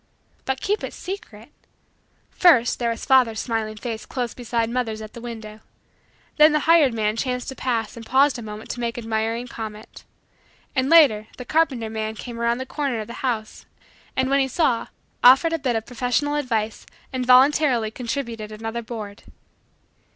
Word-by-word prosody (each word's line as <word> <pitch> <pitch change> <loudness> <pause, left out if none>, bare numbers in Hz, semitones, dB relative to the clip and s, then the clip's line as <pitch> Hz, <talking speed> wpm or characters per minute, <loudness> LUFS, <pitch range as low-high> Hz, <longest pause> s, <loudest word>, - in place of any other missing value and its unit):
But 265 0 -2
keep 415 +2 -1
it - - -5
secret! 270 - -8 0.8
First 280 -10 +4
there 235 -1 0
was 230 - -4
father's 250 -5 +4
smiling 220 -2 -2
face 225 -1 -5
close 245 -2 -3
beside 235 -2 -1
mother's 230 -2 -2
at 215 0 -9
the 235 - -9
window. 220 -3 -8 0.8
Then 305 0 +7
the 300 - +2
hired 320 -4 +5
man 215 -1 0
chanced 250 +1 -2
to 265 - -7
pass 230 -5 -2
and 230 - -9
paused 265 +3 +3
a - - -6
moment 215 -1 -7
to - - -6
make 235 -1 -3
admiring 225 +1 -2
comment. 220 -2 -8 0.7
And, 260 0 +1
later, 270 -11 +6
the 250 - -7
carpenter 275 -7 +1
man 220 0 -3
came 235 +1 -8
around 235 0 +1
the 260 - -5
corner 275 -4 -2
of - - -6
the - - -6
house 225 -5 -3 0.5
and, 260 0 +1
when 275 +1 +3
he 270 - +2
saw, 260 -3 +1 0.4
offered 270 +7 +7
a 330 - 0
bit 255 -4 -1
of 225 0 -2
professional 250 +5 -1
advice 230 -7 -2 0.3
and 255 -1 -1
voluntarily 255 -2 +4
contributed 230 -3 -5
another 225 +2 -5
board. 220 -3 -8
240 Hz, 175 wpm, -23 LUFS, 225-265 Hz, 0.8 s, Then